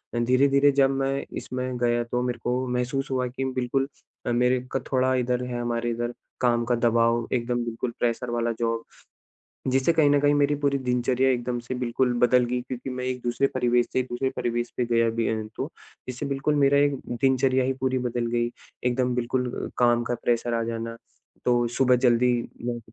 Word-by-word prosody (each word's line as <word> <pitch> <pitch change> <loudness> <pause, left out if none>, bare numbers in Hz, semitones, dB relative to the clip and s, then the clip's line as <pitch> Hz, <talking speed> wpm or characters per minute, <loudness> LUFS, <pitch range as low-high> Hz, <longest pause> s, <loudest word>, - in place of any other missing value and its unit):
अ, - - +1
धीरे-धीरे 140 +4 +4
जब 135 - +5
मैं 135 0 -1
इसमें 130 0 -4
गया 120 0 +1
तो 125 +1 -2
मेरे 125 -1 -2
को 125 +1 0
महसूस 125 +3 -2
हुआ 130 -1 0
कि 130 +2 -4
बिल्कुल 135 +2 0 0.4
अ, - - 0
मेरे 125 +1 +3
का 135 - 0
थोड़ा 130 -1 +2
इधर 125 0 0
है 120 -1 -3
हमारे 120 0 -1
इधर 120 +1 -3 0.3
काम 120 -1 +3
का 120 0 +1
दबाव, 115 0 +2
एकदम 120 -1 0
बिल्कुल 115 +1 -3
प्रेशर 120 +1 -1
वाला 120 0 0
जॉब 115 -1 -1 0.9
जिससे 135 +5 +3
कहीं 155 -3 +4
न 145 0 +4
कहीं 145 0 +4
मेरी 145 0 +3
पूरी 140 -1 +2
दिनचर्या 125 0 +1
एकदम 120 -1 -1
से 120 +2 -5
बिल्कुल 125 0 0
बदल 125 0 +4
गई। 125 +1 -1
क्योंकि 125 +1 -6
मैं 125 0 -4
एक 130 -1 -3
दूसरे 120 +3 +1
परिवेश 120 -1 +2
से, 130 - +2
दूसरे 130 +1 -2
परिवेश 120 -1 -2
पे 125 - +1
गया 115 -1 +2
भी 115 0 -1
अ, 110 - 0
हूँ 110 -1 -5
तो 140 +5 -4 0.4
इससे 130 +3 -4
बिल्कुल 140 +2 0
मेरा 140 -1 +4
एक 145 0 +3 0.3
दिनचर्या 130 0 +3
ही 130 +1 0
पूरी 130 0 +1
बदल 120 0 -2
गई। 120 0 0 0.3
एकदम 125 0 +1
बिल्कुल 125 +1 -2
काम 120 -1 +3
का 120 +1 -2
प्रेशर 120 0 +1
आ 115 0 0
जाना, 115 0 -4 0.5
तो 120 -1 +3
सुबह 125 +2 +3
जल्दी 125 0 +4 0.3
ब 120 -1 -2
125 Hz, 195 wpm, -25 LUFS, 120-130 Hz, 0.9 s, जब